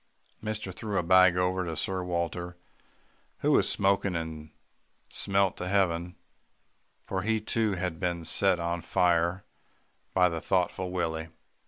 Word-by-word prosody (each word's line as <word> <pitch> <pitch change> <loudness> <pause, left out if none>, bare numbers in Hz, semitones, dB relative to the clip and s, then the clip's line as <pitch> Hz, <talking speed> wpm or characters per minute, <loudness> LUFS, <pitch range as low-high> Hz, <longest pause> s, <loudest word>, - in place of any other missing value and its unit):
"Mister 110 -3 -4
threw 105 +2 -4
a - - +1
bag 95 0 +5
over 90 -2 0
Sir 95 +4 -2
Walter, 85 0 -3 0.8
who - - +2
was - - +4
smoking 100 -1 +1
and 80 -2 -5 0.6
smelt 100 -1 +1
to 90 - -4
heaven, 90 -3 0 0.9
for 95 - -2
he 110 +2 +1
too 110 0 0
had 90 -3 -3
been 85 -2 -2
set 95 +2 +3
on 85 0 -2
fire 85 +3 +1 0.7
by 90 -1 +5
the 85 -2 -3
thoughtful 90 0 0
Willie. 80 -3 -2
90 Hz, 135 wpm, -28 LUFS, 85-95 Hz, 0.9 s, bag